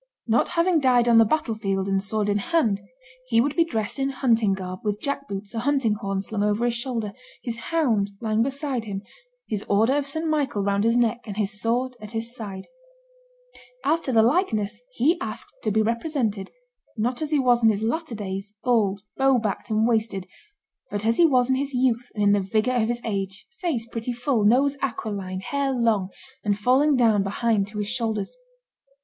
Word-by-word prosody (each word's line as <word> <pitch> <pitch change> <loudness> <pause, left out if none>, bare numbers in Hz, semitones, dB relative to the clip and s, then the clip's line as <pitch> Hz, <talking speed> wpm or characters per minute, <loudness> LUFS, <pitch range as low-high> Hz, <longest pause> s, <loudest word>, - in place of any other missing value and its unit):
Not 230 0 +2
having 335 -1 +4
died 250 -3 +3
on 230 -1 +6
the 225 - +7
battle 235 -1 0
field 195 -3 -2
and 195 0 +1
sword 210 +1 -1
in 205 0 +1
hand, 220 - +1 0.5
he 230 -2 +3
would 280 +5 +1
be 335 - +5
dressed 225 -5 -3
in 270 0 +1
hunting 230 -6 +2
garb, 185 -1 -5
with 210 -1 -1
jack 280 +3 -3
boots, 200 +2 -6
a 230 - -2
hunting 265 -3 +1
horn, 195 -2 -2
slung 210 0 -3
over 210 +3 +1
his 240 - +1
shoulder, 235 -4 -3 0.3
his 235 -2 -4
hound 240 -12 +2
lying 220 -1 0
beside 270 -2 -2
him, 200 -1 -5 0.4
his 210 -1 -2
order 220 +5 +3
of 290 -1 0
St. 315 +3 -2
Michael 285 -10 0
round 200 +1 +1
his 230 +1 +3
neck, 240 0 +1
and 205 -1 -6
his 210 0 +1
sword 250 +3 0
at 215 +1 -9
his 230 +1 -3
side. 200 -5 -6 1.2
As 325 +3 +2
to 265 - -3
the 225 -2 +5
likeness, 230 - +1
he 335 - +2
asked - - -6
to - - 0
be 215 +1 +2
represented, 230 -3 -1 0.5
not 240 +5 -1
as 310 - -2
he 300 - +2
was 245 -3 +3
in 225 - +6
his 210 0 0
latter 250 +2 -2
days, 200 0 -5
bald, 205 -5 +1
bow 270 -1 +4
backed, 220 -1 -3
and 220 +1 +2
wasted, 220 -5 0 0.6
but 205 +1 -3
as 230 +1 +2
he 340 - +6
was 250 -4 +3
in 260 - +3
his 275 0 -3
youth 245 -1 +1
and 210 - 0
in 200 - +5
the 205 - +4
vigor 215 +5 0
of 230 -3 +2
his 240 0 -2
age, 195 -2 -3
face 315 - -1
pretty 235 +1 -4
full, 240 -2 0
nose 270 +6 +4
aquiline, 200 -7 -3
hair 280 +5 -1
long, 225 -7 +1 0.3
and 205 -1 +1
falling 265 +7 +3
down 225 -5 +4
behind 200 +1 0
to 215 0 -9
his 205 -1 -2
shoulders. 225 - -2
230 Hz, 200 wpm, -24 LUFS, 205-260 Hz, 1.2 s, the